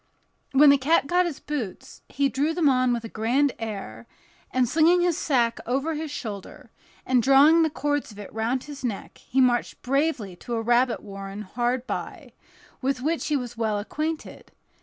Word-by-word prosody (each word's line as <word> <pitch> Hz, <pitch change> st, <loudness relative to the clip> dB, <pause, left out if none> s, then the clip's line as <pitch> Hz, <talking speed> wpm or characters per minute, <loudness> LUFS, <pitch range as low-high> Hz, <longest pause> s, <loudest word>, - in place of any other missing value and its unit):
When 285 Hz, +1 st, +7 dB
the 280 Hz, -, +4 dB
cat 300 Hz, +3 st, +3 dB
got 355 Hz, +4 st, +2 dB
his 320 Hz, -, -6 dB
boots, 255 Hz, -11 st, -6 dB
he 280 Hz, 0 st, +1 dB
drew 290 Hz, +4 st, -1 dB
them 340 Hz, -4 st, +2 dB
on 255 Hz, -2 st, +3 dB
with 235 Hz, -1 st, -1 dB
a -, -, -5 dB
grand 245 Hz, +6 st, +1 dB
air, 195 Hz, -, -6 dB, 0.4 s
and 255 Hz, -1 st, +1 dB
slinging 330 Hz, +7 st, +4 dB
his 350 Hz, -2 st, +2 dB
sack 240 Hz, -7 st, +1 dB
over 275 Hz, +6 st, 0 dB
his 310 Hz, 0 st, -4 dB
shoulder, 215 Hz, -8 st, -7 dB, 0.3 s
and 255 Hz, -1 st, +3 dB
drawing 280 Hz, +6 st, +6 dB
the 320 Hz, -, +3 dB
cords 290 Hz, -3 st, -2 dB
of 205 Hz, -, -14 dB
it 205 Hz, -2 st, -9 dB
round 230 Hz, +4 st, -1 dB
his 290 Hz, -2 st, -10 dB
neck, 225 Hz, -5 st, -5 dB
he 265 Hz, -, -2 dB
marched 245 Hz, -2 st, +1 dB
bravely 265 Hz, -, 0 dB
to 240 Hz, +5 st, -5 dB
a 225 Hz, -, -1 dB
rabbit 240 Hz, +1 st, +2 dB
warren 195 Hz, 0 st, -7 dB
hard 240 Hz, +4 st, -2 dB
by, -, -, -6 dB, 0.5 s
with 265 Hz, -1 st, -1 dB
which 325 Hz, +3 st, -1 dB
he 300 Hz, -, +1 dB
was 245 Hz, -3 st, -6 dB
well 220 Hz, -2 st, 0 dB
acquainted. 305 Hz, +9 st, -5 dB
255 Hz, 180 wpm, -25 LUFS, 230-295 Hz, 0.5 s, When